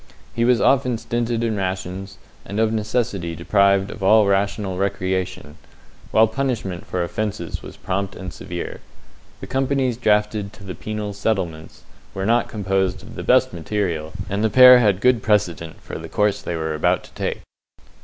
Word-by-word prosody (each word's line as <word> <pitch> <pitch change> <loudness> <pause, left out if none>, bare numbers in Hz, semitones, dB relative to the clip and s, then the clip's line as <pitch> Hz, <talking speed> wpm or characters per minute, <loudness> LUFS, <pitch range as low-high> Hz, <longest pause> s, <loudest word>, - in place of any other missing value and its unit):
He 115 - +1
was 125 -1 +4
often 125 -3 +3
stinted 120 0 -2
in 115 -2 0
rations, 95 0 -4 0.3
and 100 +2 -5
of 110 0 +2
necessity 105 -6 -1
deprived 100 +3 +2
of 105 - -10
all 105 +2 +5
rational 100 -1 0
recreation, 95 -5 -2 0.5
while 110 0 +5
punishment 110 -7 -3
for 90 -1 -1
offences 105 +4 -4
was - - -11
prompt 95 0 -3
and 95 -2 -7
severe. 85 +1 -6 0.6
The - - -6
companies 135 -2 0
drafted 105 -2 +1
to 100 - -14
the 95 -1 -6
penal 105 0 -5
settlements 95 -6 -3 0.3
were 95 0 -2
not 115 +2 +2
composed 95 -2 -1
of - - -11
the - - -6
best - - +3
material, 85 -3 -2 0.2
and 100 +2 -2
the 110 - +3
pair 125 +3 +9
had 105 -5 +2
good 125 -2 +4
precedent 90 -7 0
for - - -7
the - - -9
course 105 -1 +1
they 85 - -4
were 80 -1 -2
about 75 - +1
to - - -16
take. - - -3
100 Hz, 165 wpm, -21 LUFS, 95-110 Hz, 0.6 s, pair